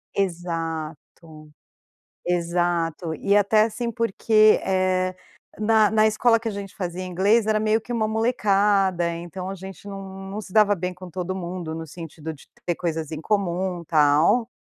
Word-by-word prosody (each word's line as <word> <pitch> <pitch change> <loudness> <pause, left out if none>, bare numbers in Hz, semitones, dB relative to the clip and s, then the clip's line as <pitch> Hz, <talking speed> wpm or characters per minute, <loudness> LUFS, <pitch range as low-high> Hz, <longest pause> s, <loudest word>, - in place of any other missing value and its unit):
Exato, 165 -3 -4 0.8
exato, 170 -1 0
e 200 +4 +1
até 210 +1 +4
assim 230 +2 -1
porque, 215 -1 +3
eh, 185 -1 +1 0.4
na 215 -1 +4
na 220 0 +4
escola 230 +2 +3
que 230 - -3
a - - -1
gente 200 -2 -7
fazia 180 -1 -4
inglês, 200 +5 +2
era 215 -1 +2
meio 215 +1 +2
que 240 - -7
uma 220 -2 0
molecada, 200 -5 +2
então 175 +2 -7
a - - -4
gente 190 +1 -10
não 195 -1 -8
não 210 +2 -4
se 185 - -12
dava 210 -2 +5
bem 180 0 -3
com 180 0 -11
todo 185 +2 -4
mundo, 175 -3 -5
no 165 0 -6
sentido 160 -1 -8
de 150 - -15 0.2
ter 175 - +1
coisas 160 -3 -3
em 155 - -4
comum, 185 -2 -1
tal. 155 +9 +3
185 Hz, 160 wpm, -24 LUFS, 170-215 Hz, 0.8 s, dava